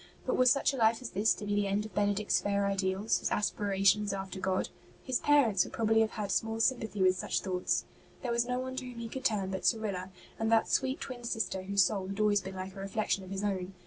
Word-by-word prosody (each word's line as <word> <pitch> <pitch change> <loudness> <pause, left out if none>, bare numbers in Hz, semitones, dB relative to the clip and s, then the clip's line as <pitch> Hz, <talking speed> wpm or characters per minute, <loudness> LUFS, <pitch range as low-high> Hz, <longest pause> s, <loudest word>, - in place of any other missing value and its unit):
But - - 0
was 255 0 +5
such 275 +1 +3
a - - -4
life 225 -1 +3
as 240 - -6
this 205 +3 +2
to 210 - -7
be 205 - -1
the 205 -1 +1
end 200 +2 0
of 215 - -10
Benedict's 205 0 +1
fair 200 0 0
ideals, 195 +1 0
his - - -2
aspirations 205 0 +1
after 195 0 -5
God? 185 0 -1 0.3
His 255 -2 0
parents 245 -11 +4
would - - -10
probably 225 0 +2
have 220 - +2
had 210 -3 -4
small 225 +2 0
sympathy 225 -5 +1
with 185 0 +4
such - - -1
thoughts. 180 -2 -1 0.4
There 245 - -1
was 235 0 +1
no 250 0 -1
one 260 0 -4
to 260 - -3
whom 245 - -10
he 235 0 -5
could 260 +3 -7
turn 200 -5 +1
but 190 - -4
Cyrilla, 200 -5 0 0.3
and 225 0 0
that 225 -1 +4
sweet 265 0 0
twin 250 -2 -7
sister 225 -5 -2
whose 200 +1 +3
soul 195 -1 -1
had 195 +2 -5
always 210 -1 +3
been 190 0 -8
like 185 +1 -6
a - - -8
reflection 195 0 -1
of 185 - -11
his 195 +1 -4
own. 190 -2 -2
205 Hz, 245 wpm, -31 LUFS, 195-225 Hz, 0.4 s, was